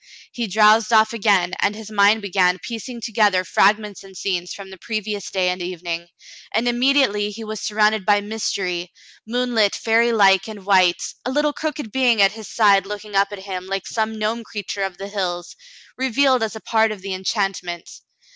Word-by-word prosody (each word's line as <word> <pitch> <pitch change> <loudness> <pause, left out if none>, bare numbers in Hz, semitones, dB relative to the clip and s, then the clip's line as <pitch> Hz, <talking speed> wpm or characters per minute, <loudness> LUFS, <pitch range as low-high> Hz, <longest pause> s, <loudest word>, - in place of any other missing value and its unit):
He 235 -2 -3
drowsed 215 +2 +4
off 220 0 +4
again, 195 -5 +2
and 205 +1 +1
his 220 0 -10
mind 205 +1 +4
began 185 -2 +2
piecing 235 +3 -7
together 210 -5 +2
fragments 210 +1 +1
and 190 -1 -13
scenes 180 -2 -2
from 195 -1 -9
the 190 - -12
previous 215 -2 -4
day 185 -1 0
and 180 0 -3
evening, 175 -1 -5 0.5
and 230 +3 +1
immediately 240 -4 +2
he 220 +2 -8
was 215 -1 -6
sur 210 - -4
rounded 215 -1 +3
by 205 +1 +3
mystery, 195 -4 -3 0.4
moonlit, 235 -3 +1
fairylike, 225 -4 +3
and 210 -3 -9
white, 185 -3 +3 0.2
a - - -3
little 295 +2 +1
crooked 295 -8 -4
being 245 -3 +2
at 195 -1 +5
his 220 -2 -10
side 200 -3 +3
looking 210 0 -7
up 195 +1 +4
at 195 -2 -8
him 185 -2 -6
like 195 -1 -3
some 220 -1 -2
gnome 220 +2 -2
creature 205 -2 -6
of 190 -2 -3
the 195 - -7
hills, 180 -4 -4 0.4
revealed 265 0 +2
as 220 0 -2
a 220 - -8
part 220 -1 +2
of 200 -3 -8
the 195 -1 -4
en 185 0 -6
chantment. 190 -4 -2
210 Hz, 185 wpm, -21 LUFS, 190-225 Hz, 0.5 s, at